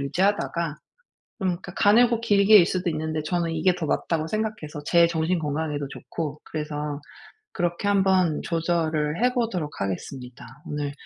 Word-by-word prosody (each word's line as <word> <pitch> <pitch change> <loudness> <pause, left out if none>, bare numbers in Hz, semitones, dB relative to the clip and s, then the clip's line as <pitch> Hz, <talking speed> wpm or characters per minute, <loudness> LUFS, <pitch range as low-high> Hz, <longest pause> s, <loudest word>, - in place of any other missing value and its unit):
유지하다가 170 0 0 0.6
좀 190 - 0
그러니까 175 +1 -5
가늘고 230 +2 +4
길게 205 -1 +6
일 175 - +6
수도 180 0 -1
있는데 155 -1 -2
저는 170 0 -1
'이게 175 +3 +2
더 175 -3 -3
맞다.'고 160 -2 -1
생각해서 210 -7 -3
제 170 -1 +5
정신건강에도 160 -3 -1
좋고 150 0 -6
그래서 150 -1 -4 0.5
그렇게 175 +3 -1
한번 190 -5 +3
조절을 165 0 -1
해 250 - +3
보도록 190 -11 -2
하겠습니다. 125 +6 -5 0.2
오늘 145 -1 -3
165 Hz, 345 characters per minute, -25 LUFS, 150-190 Hz, 0.6 s, 길게